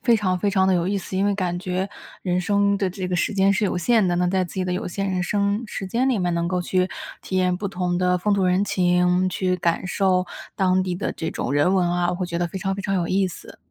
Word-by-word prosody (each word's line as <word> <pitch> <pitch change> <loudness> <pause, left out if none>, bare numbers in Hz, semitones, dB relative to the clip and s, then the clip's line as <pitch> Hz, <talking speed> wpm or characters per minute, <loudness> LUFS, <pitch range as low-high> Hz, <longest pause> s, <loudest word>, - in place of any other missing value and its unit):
非 235 - +4
常 185 -3 0
非 205 - 0
常 190 -1 +2
地 190 - +4
有 170 -1 +1
意 200 +2 0
思。 185 0 -6
因 195 - +2
为 205 - +2
感 180 -3 -2
觉 185 +1 -2 0.3
人 180 -1 0
生 200 +1 +2
的 195 -1 0
这 185 -1 -5
个 180 - -1
时 195 +6 0
间 195 0 +4
是 210 +2 +1
有 185 - 0
限 220 +1 +3
的。 175 - +1
那 180 0 +2
在 185 0 +1
自 175 - -10
己 185 -1 -1
的 180 - -2
有 185 +5 -3
限 195 +2 -2
人 180 -1 -1
生 200 +4 0
时 195 -2 -5
间 240 +7 0
里 245 - +1
面， 180 -2 0
能 170 0 0
够 180 0 0
去 185 +1 +1 0.3
体 190 - -3
验 180 -1 +2
不 200 - -4
同 180 -2 -2
的 180 0 +2
风 205 +3 0
土 195 -2 +1
人 180 +2 +2
情， 180 -1 +2
去 185 0 0
感 170 +1 0
受 185 -1 +1 0.3
当 185 -1 +2
地 180 -1 -2
的 - - -3
这 160 - -4
种 125 - -3
人 145 +6 +3
文 180 -2 +2
啊， 175 0 +1
我 180 - -2
会 180 0 -3
觉 170 -1 -3
得 175 - 0
非 190 +3 -6
常 195 0 -1
非 200 - -5
常 195 - -1
有 175 -2 0
意 190 0 +2
思。 180 - -10
185 Hz, 305 characters per minute, -23 LUFS, 180-195 Hz, 0.3 s, 非